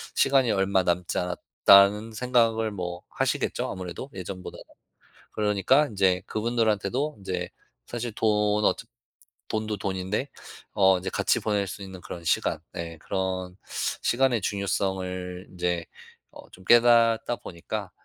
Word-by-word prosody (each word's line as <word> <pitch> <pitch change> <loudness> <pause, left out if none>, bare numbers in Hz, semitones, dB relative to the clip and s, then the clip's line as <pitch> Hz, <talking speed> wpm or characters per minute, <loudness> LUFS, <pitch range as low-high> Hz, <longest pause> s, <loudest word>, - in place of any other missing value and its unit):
'시간이 135 -4 +3
얼마 95 -1 +2
남지 90 0 -1
않았다.'는 100 +4 +4
생각을 115 -2 +2
뭐 90 -3 -5
하시겠죠? - - -1
아무래도 90 - -6
예전보다는. 95 0 -7 0.7
그러니깐 105 +8 +2
인제 95 -2 +2
그분들한테도 115 +4 0
인제 90 -2 -4 0.4
사실 120 -1 -4
돈 105 -1 +2
어차 - - +1 0.6
돈도 110 -1 -2
돈인데 95 +7 -2 0.5
어 95 -2 +5
인제 90 - -4
같이 - - +1
보낼 105 -2 0
수 100 +2 -7
있는 95 -1 -9
그런 85 - -8
시간 - - +1 0.2
예 85 -1 -6
그런 95 0 -3 0.5
시간의 125 -2 +2
중요성을 95 -2 -2
인제 90 -2 -2 0.5
어 - - -13
좀 95 - -15
깨닫다 120 +1 +5
보니까 85 -1 -6
100 Hz, 285 characters per minute, -26 LUFS, 90-110 Hz, 0.7 s, 어